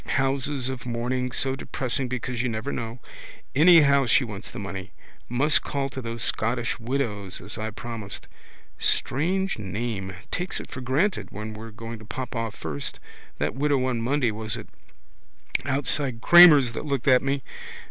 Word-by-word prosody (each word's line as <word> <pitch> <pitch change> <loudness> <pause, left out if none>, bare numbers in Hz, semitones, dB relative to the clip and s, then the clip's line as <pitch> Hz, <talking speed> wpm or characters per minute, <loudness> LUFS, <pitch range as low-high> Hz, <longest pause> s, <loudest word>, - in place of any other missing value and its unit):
Houses 135 -1 +1
of 130 -2 -5
mourning 125 +2 -1
so 130 +2 +1
depressing 130 0 -2
because 125 -1 -3
you 125 - 0
never 110 +5 -3
know. 115 0 -4 0.6
Anyhow 145 -4 +6
she 125 - +4
wants 105 -5 -6
the - - -9
money. 100 -1 -6 0.4
Must 140 +5 +3
call 140 -1 -2
to 130 - -6
those 115 -2 -3
Scottish 120 +2 0
Widows 115 -6 -2
as - - -4
I 110 0 -2
promised. 110 -2 -7 0.5
Strange 185 - 0
name. 100 -1 -4 0.2
Takes 180 +1 -2
it - - -10
for 130 - -6
granted 150 +11 0
we're 110 +2 -7
going 115 +1 -8
to 110 - -12
pop 130 +4 -6
off 115 -2 -3
first. 75 -3 -5 0.4
That - - -1
widow 140 -1 +1
on 125 -3 -1
Monday 125 0 +1
was 110 0 -2
it - - -9 1.0
outside 135 -2 0
Cramer's 150 -5 +8
that 150 - -5
looked 140 -3 -2
at 130 -2 +6
me. 135 -1 -1
125 Hz, 155 wpm, -25 LUFS, 115-140 Hz, 1.0 s, Cramer's